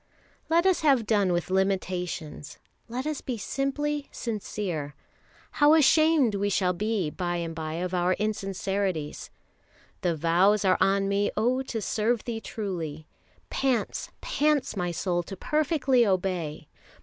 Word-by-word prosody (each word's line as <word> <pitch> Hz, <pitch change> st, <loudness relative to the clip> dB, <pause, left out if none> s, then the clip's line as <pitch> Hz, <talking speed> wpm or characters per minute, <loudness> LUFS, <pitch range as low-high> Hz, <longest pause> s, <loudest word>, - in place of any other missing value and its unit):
Let 335 Hz, +2 st, +3 dB
us 375 Hz, -2 st, +3 dB
have 275 Hz, -7 st, +4 dB
done 205 Hz, -4 st, +2 dB
with 175 Hz, +1 st, -1 dB
limitations, 180 Hz, -6 st, -2 dB, 0.3 s
let 250 Hz, +3 st, -4 dB
us 305 Hz, -2 st, -2 dB
be 250 Hz, -3 st, -4 dB
simply 285 Hz, +4 st, -2 dB
sincere. 195 Hz, -, -4 dB, 0.6 s
How 300 Hz, 0 st, +5 dB
ashamed 310 Hz, -4 st, +4 dB
we 200 Hz, 0 st, 0 dB
shall 185 Hz, -2 st, +1 dB
be 200 Hz, -4 st, -1 dB
by 175 Hz, 0 st, -2 dB
and 170 Hz, -1 st, -3 dB
by 160 Hz, -1 st, -4 dB
of 180 Hz, +2 st, -3 dB
our 180 Hz, 0 st, +2 dB
insincerities: 195 Hz, -5 st, -2 dB, 0.7 s
Thy 175 Hz, -, +1 dB
vows 180 Hz, +6 st, +3 dB
are 185 Hz, -1 st, +3 dB
on 195 Hz, +1 st, +3 dB
me, 200 Hz, +1 st, +1 dB
oh 245 Hz, +4 st, +2 dB
to 230 Hz, -5 st, -4 dB
serve 220 Hz, +3 st, 0 dB
Thee 230 Hz, -2 st, -4 dB
truly, 165 Hz, -10 st, -5 dB, 0.5 s
Pants, 260 Hz, -5 st, -1 dB
pants 295 Hz, -5 st, +1 dB
my 180 Hz, -2 st, -1 dB
soul 175 Hz, +1 st, -1 dB
to 190 Hz, +3 st, -9 dB
perfectly 290 Hz, -, +2 dB
obey! 180 Hz, -7 st, -1 dB
200 Hz, 135 wpm, -27 LUFS, 175-250 Hz, 0.7 s, How